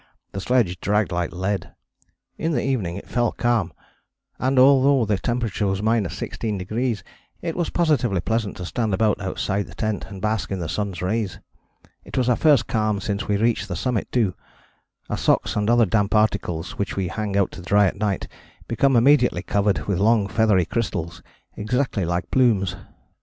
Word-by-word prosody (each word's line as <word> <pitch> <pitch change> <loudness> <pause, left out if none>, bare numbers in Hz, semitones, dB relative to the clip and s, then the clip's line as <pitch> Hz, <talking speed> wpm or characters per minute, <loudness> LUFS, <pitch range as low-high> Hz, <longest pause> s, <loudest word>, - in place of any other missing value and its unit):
The 95 - -5
sledge 105 -7 +1
dragged 105 0 +1
like 85 0 -1
lead. 95 +3 -3 0.6
In 165 0 -2
the - - 0
evening 110 -11 -1
it 100 - -8
fell 120 -2 +1
calm, 115 -7 0 0.7
and 130 +1 0
although 135 -1 +5
the 105 -2 0
temperature 115 -3 -1
was 95 0 -1
16° 110 +2 -2 0.4
it 165 -2 -3
was 175 -2 -1
positively 145 - +1
pleasant 110 +2 -2
to 90 - -5
stand 110 +1 -1
about 105 0 +1
outside 100 +1 -2
the 90 - -13
tent 110 -1 -2
and 100 -2 -8
bask 105 +1 -1
in 95 - -1
the 85 -3 -4
sun's 100 0 -3
rays. 105 0 -1 0.7
It - - -8
was 125 -1 +2
our 125 - +4
first 145 -4 +4
calm 110 -2 0
since 100 +3 -3
we 105 - +1
reached 115 -1 +1
the 90 - -4
summit 120 +3 -2
too. 110 -7 +1 0.7
Our - - -3
socks - - +1
and 105 +1 0
other 120 -1 +5
damp 105 +1 +1
articles 95 -6 0
which 100 - -2
we 95 -2 -1
hang 105 +1 -2
out 100 - +2
to - - -9
dry 100 +3 +3
at 95 - 0
night 100 -2 -2 0.4
become 135 +3 +2
immediately 125 -6 +4
covered 100 -7 0
with 100 -4 -1
long 105 0 +3
feathery 105 -3 +2
crystals 85 -6 -3 0.3
exactly 115 -3 -1
like 85 +2 -2
plumes. 105 -8 +2
105 Hz, 175 wpm, -23 LUFS, 95-120 Hz, 0.7 s, although